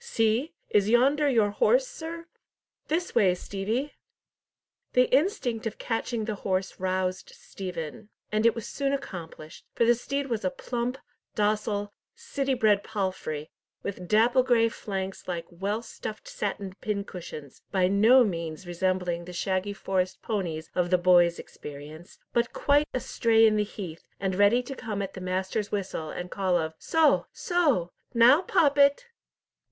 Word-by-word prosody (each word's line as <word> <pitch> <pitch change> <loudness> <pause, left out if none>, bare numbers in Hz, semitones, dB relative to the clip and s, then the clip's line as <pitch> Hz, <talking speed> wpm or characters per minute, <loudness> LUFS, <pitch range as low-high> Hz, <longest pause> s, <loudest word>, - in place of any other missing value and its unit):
See! 230 - 0 0.2
Is 205 0 +3
yonder 280 +5 +4
your 220 -6 +3
horse, - - +3
sir? 335 -8 -7 0.6
This 335 +3 -1
way, 195 -6 +4
Stevie!" 215 +10 -3 1.0
The 250 0 +3
instinct 265 - 0
of 220 - -6
catching 225 -1 -2
the 215 - -2
horse 190 0 -2
roused 185 0 -1
Stephen, 180 +1 -7 0.2
and 215 0 +1
it 230 -1 +4
was 230 - -5
soon 275 -1 -1
accomplished, 170 - -7
for 235 - +3
the 240 - +6
steed 275 +4 -3
was 230 -5 -3
a - - +2
plump, 250 -1 -3 0.4
docile, 210 -1 0 0.2
city 280 - -2
bred 210 -4 +3
palfrey, 185 -8 -3 0.3
with 185 -3 -5
dapple 235 +5 +4
grey 240 -3 +3
flanks 195 -3 -5
like 170 -2 -3
well 200 +6 -2
stuffed 215 -2 -7
satin 200 -2 -4
pincushions, 180 -9 -5
by 185 -2 +3
no 220 +7 +6
means 170 -4 -3
resembling 175 -1 -1
the 180 - -9
shaggy 190 +3 -1
Forest 190 -2 -2
ponies 170 -7 -3
of 180 -1 0
the 180 - +4
boys' 175 -1 +5
experience, 150 +5 -10 0.2
but 235 0 +1
quite 290 +1 +3
astray 230 -2 +3
in 215 -1 +4
the 210 - +2
heath, 185 -5 -7 0.2
and 190 -1 -1
ready 205 +6 +4
to 270 - -6
come 210 -5 -4
at 195 - -6
the 185 - -8
master's 185 +3 -2
whistle, 190 -6 -3
and 180 +3 -6
call 185 -3 +1
of 160 -1 -2
"Soh! 320 -3 +3
Soh!—now 260 - +3
Poppet!" 285 - +3
210 Hz, 145 wpm, -27 LUFS, 185-245 Hz, 1.0 s, the